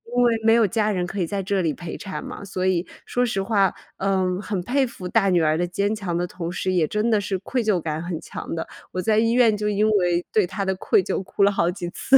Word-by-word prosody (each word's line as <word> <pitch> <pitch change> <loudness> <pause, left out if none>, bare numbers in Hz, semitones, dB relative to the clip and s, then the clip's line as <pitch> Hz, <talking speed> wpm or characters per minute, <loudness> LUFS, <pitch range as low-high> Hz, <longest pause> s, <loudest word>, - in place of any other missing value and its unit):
因 245 - +4
为 240 -1 +4
没 225 - +6
有 230 -1 +5
家 215 +2 +1
人 185 -4 0
可 195 +3 -5
以 170 - 0
在 195 +2 -2
这 195 0 0
里 160 -4 0
陪 175 +1 -7
产 195 -2 -6
嘛， - - -8
所 185 -1 -3
以 185 -1 +1 0.2
说 245 0 +1
实 195 -5 -1
话， 195 -2 +2 0.2
嗯， 190 -1 0
很 205 -2 -3
佩 265 +6 +1
服 190 -5 -10
大 195 0 +2
女 180 -2 +3
儿 155 0 +2
的 175 +1 0
坚 200 +4 0
强 195 -6 -2
的 175 - 0
同 170 -1 -5
时， 185 +1 -1
也 175 -4 +2
真 215 +5 0
的 215 - +4
是 195 -1 -2
愧 250 +6 -2
疚 215 -4 +2
感 155 -1 -3
很 170 -1 -4
强 - - -6
的， 165 - -3 0.3
我 185 - -1
在 215 +2 +3
医 230 +1 +3
院 235 -3 +4
就 210 0 -2
因 210 +1 +2
为 175 -4 +2
对 210 -4 +3
她 200 - -3
的 190 - +1
愧 385 - +2
疚 - - -2
哭 190 +2 0
了 200 - +5
好 170 -4 +1
几 175 -1 -4
次。 270 +9 +4
195 Hz, 290 characters per minute, -23 LUFS, 175-215 Hz, 0.3 s, 没